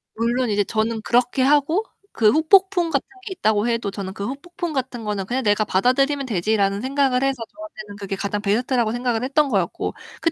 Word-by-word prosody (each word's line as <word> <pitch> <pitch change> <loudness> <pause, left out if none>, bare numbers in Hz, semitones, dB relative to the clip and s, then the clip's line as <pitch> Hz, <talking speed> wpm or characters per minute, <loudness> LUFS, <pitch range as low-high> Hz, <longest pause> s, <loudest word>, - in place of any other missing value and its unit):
물론 235 +2 0
이제 205 -1 +2
저는 220 +1 -1
그렇게 245 +3 +1
하고, 295 +8 +3 0.3
그 215 -2 +3
후폭풍 355 - +4
같은 - - -1 0.2
게 410 - -6
있다고 220 - +1
해도 230 -4 -1
저는 195 -1 -6
'그 200 - -5
후폭풍 335 +4 -5
같은 255 -3 -3
거는 205 -2 -2
그냥 250 +5 -2
내가 205 0 +2
받아들이면 275 +8 +1
되지.'라는 200 -1 0
생각을 270 -1 +1
해서 270 0 +1 0.2
저한테는 300 -11 -10
그게 200 -1 -4
가장 200 +1 -3
베스트라고 230 +2 +1
생각을 240 -1 -1
했던 290 +3 +2
거였고, 190 -7 -1 0.3
그 330 - +2
240 Hz, 425 characters per minute, -22 LUFS, 210-275 Hz, 0.3 s, 후폭풍